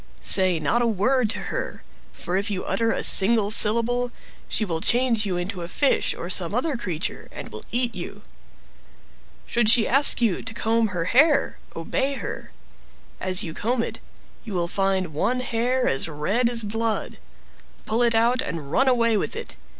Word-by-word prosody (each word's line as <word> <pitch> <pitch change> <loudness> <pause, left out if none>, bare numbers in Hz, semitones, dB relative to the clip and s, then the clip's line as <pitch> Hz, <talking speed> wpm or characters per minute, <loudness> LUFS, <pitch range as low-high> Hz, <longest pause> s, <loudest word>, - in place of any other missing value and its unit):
Say 185 -3 +4
not 155 +11 0
a 240 - +1
word 230 +3 +1
to - - -2 0.2
her; - - -5 0.3
for 180 - -5
if 200 +3 -1
you 195 -3 -3
utter 225 +4 0
a - - -2
single 205 +1 +5
syllable, 235 +3 +2 0.4
she 220 - 0
will 165 -4 -3
change 235 -2 +2
you 180 -2 -2
into 180 +1 -4
a 170 - -5
fish 275 +10 0
or - - -7
some - - -1
other 320 -4 -1
creature, 180 -8 -4
and - - -9 0.2
eat 240 -1 0
you. 200 +2 -8 1.2
Should 235 -2 +1
she 225 -1 +4
ask 275 +3 +5
you 225 -7 0
to 225 - -6
comb 225 0 +1
her 180 -4 -3
hair, 280 - +2 0.2
obey 265 +12 -2
her. - - -7 0.7
As 185 +3 +2
you 160 - -6
comb 230 +5 -1
it, - - -6 0.4
you 215 -5 -7
will 170 -1 -1
find 190 -3 -1
one 250 +12 -1
hair 250 +1 -1
as 135 - 0
red 195 +11 0
as 235 -2 +2
blood; 225 +1 -3 0.7
pull 225 +2 -1
it 235 -1 +2
out, 240 +3 +2
and 150 -4 -6
run 265 +10 +2
away 230 -3 +2
with - - -3
it. - - -7
225 Hz, 175 wpm, -23 LUFS, 185-240 Hz, 1.2 s, single